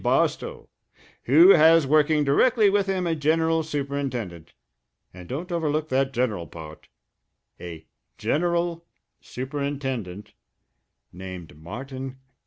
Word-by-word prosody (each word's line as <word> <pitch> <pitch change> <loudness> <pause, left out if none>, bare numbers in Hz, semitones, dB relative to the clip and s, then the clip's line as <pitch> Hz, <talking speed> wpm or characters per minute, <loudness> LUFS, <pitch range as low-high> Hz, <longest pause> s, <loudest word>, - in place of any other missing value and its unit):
Barstow, - - 0 0.6
who 165 +9 +7
has 165 -2 +6
working 150 +1 +3
directly 210 - +3
with 200 -1 +1
him 190 -2 -1
a 170 - 0
general 160 +1 +1
superintendent 135 - -4 0.6
and 90 -1 -12
don't 170 +8 -5
overlook 155 -2 -1
that 135 +1 +1
general 115 - -1
part 80 0 -11 0.7
a 85 -3 -9 0.3
general 170 +1 -1 0.4
superintendent 130 -7 -5 0.8
named 90 -4 -9
Martin 125 - -8
Garrity!" - - -28
140 Hz, 105 wpm, -24 LUFS, 110-165 Hz, 0.8 s, who